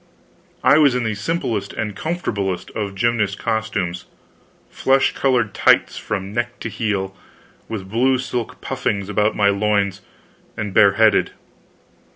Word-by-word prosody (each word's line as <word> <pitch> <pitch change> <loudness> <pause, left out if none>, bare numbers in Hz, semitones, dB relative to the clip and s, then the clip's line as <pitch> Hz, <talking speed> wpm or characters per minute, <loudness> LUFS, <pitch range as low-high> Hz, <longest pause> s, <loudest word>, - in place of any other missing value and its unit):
I 150 - +6
was 140 -5 +5
in 125 - 0
the 110 -1 -1
simplest 105 - -2
and 105 -2 -4
comfortablest 100 - -3
of 100 -2 -4
gymnast 110 -2 0
costumes 105 -6 -2 0.6
flesh 135 0 +2
colored 125 -6 +1
tights - - +3
from 100 -1 -4
neck 120 +1 -3
to - - -3
heel, 100 -4 -2 0.5
with 100 -4 -5
blue 125 +6 +2
silk 125 -2 -4
puffings 100 -1 -2
about 105 +1 +1
my 100 -1 +3
loins, 100 -1 0 0.6
and 105 -2 -4
bareheaded. - - +4
105 Hz, 130 wpm, -20 LUFS, 100-120 Hz, 0.6 s, I